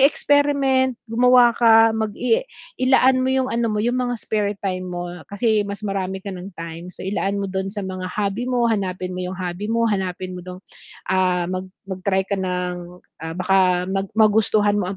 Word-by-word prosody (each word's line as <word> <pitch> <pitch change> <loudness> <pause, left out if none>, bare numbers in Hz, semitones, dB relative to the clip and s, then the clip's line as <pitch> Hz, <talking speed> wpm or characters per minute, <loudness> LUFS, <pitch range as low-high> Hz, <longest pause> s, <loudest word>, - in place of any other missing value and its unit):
mag-experiment, 275 -2 +3 0.2
gumawa 245 +1 +6
ka, 225 -1 +6
mag-i 220 - 0 0.4
ilaan 260 0 +4
mo 260 - +1
yung 260 0 +1
ano 235 0 +1
mo, 210 0 -1
yung 245 +1 +1
mga 245 -1 -1
spare 210 -2 -1
time 185 -1 -2
mo 175 0 -5 0.2
kasi 215 +1 +1
mas 200 +1 -6
marami 190 -1 -3
ka 200 - -4
ng 180 +1 -8
time. 165 +1 -7
So, - - -10
ilaan 195 0 -1
mo 195 - -3
dun 190 0 -2
sa 205 - -3
mga 185 -1 -5
hobby 205 +5 -2
mo, 245 -1 +1
hanapin 185 -3 -2
mo 180 - -5
yung 180 +1 -4
hobby 180 +2 -4
mo, 230 +1 +1
hanapin 185 -2 -3
mo - - -6
dun 180 0 -7 0.5
ah, 185 -1 +2
mag 185 0 -3 0.2
mag-try 190 +1 0
ka 200 - -2
ng, 180 -1 -4 0.2
ah, 160 0 -5
baka 185 -1 +2
mag 195 0 -1
magustuhan 210 -1 +3
mo 185 - -2
ang 190 - -4
200 Hz, 190 wpm, -21 LUFS, 185-230 Hz, 0.5 s, gumawa